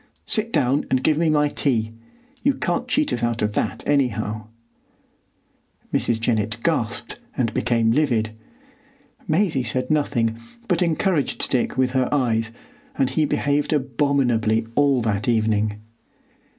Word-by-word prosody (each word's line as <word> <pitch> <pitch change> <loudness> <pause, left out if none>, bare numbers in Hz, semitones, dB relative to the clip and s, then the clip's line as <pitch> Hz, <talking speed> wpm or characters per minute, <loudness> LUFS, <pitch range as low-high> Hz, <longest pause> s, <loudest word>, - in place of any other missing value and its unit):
Sit 225 0 0
down 140 - +2
and 130 0 +1
give 155 -1 +3
me 165 -1 +2
my 150 -1 +3
tea. 115 -6 0 0.5
You 280 -1 +2
can't 210 +1 -1
cheat 295 +3 +1
us 120 - -2
out 120 -1 0
of 105 0 0
that, - - -2
anyhow." 110 -6 0 1.5
Mrs. 115 -2 +1
Jennett 110 -2 0
gasped 115 -9 -1 0.2
and 115 -4 0
became 115 -2 +2
livid. 115 -5 +1 1.0
Maisie 160 -4 +2
said 125 +3 -2
nothing, 115 -7 +1 0.3
but 180 -3 +1
encouraged 170 -2 0
Dick 125 0 0
with 130 -1 +2
her 130 -1 +1
eyes, 115 -5 +1 0.5
and 130 - +1
he 155 - +2
behaved 145 +1 0
abominably 125 -5 +1
all 140 -3 +3
that 105 -1 -1
evening. 110 -2 +1
125 Hz, 135 wpm, -22 LUFS, 115-150 Hz, 1.5 s, give